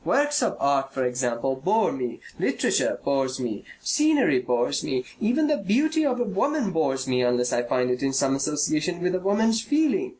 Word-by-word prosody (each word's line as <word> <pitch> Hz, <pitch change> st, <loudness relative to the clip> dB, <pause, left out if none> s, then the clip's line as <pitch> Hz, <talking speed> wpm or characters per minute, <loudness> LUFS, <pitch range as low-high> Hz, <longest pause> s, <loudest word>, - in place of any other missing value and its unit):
Works 290 Hz, +1 st, +1 dB
of -, -, 0 dB
art, 135 Hz, -1 st, +1 dB
for 130 Hz, -1 st, -2 dB
example, 125 Hz, +1 st, -1 dB
bore 200 Hz, +12 st, +1 dB
me, 125 Hz, -3 st, -5 dB, 0.2 s
literature -, -, 0 dB
bores 135 Hz, -2 st, 0 dB
me, 115 Hz, -5 st, -4 dB, 0.2 s
scenery 300 Hz, -, +2 dB
bores 125 Hz, -1 st, -1 dB
me, 130 Hz, -1 st, -2 dB
even 245 Hz, +8 st, +1 dB
the 300 Hz, -1 st, +1 dB
beauty 295 Hz, -, +1 dB
of 255 Hz, -4 st, 0 dB
a -, -, +2 dB
woman 230 Hz, +3 st, -1 dB
bores 135 Hz, -6 st, -1 dB
me, 125 Hz, -1 st, +1 dB
unless 125 Hz, 0 st, +1 dB
I 120 Hz, -, +2 dB
find 125 Hz, +1 st, 0 dB
in 125 Hz, +2 st, -2 dB
it 135 Hz, 0 st, 0 dB
some 135 Hz, 0 st, +2 dB
association 150 Hz, +4 st, -1 dB
with 180 Hz, 0 st, 0 dB
a 185 Hz, -, 0 dB
woman's 220 Hz, +4 st, +1 dB
feeling. 310 Hz, -, +1 dB
150 Hz, 190 wpm, -25 LUFS, -, 0.2 s, scenery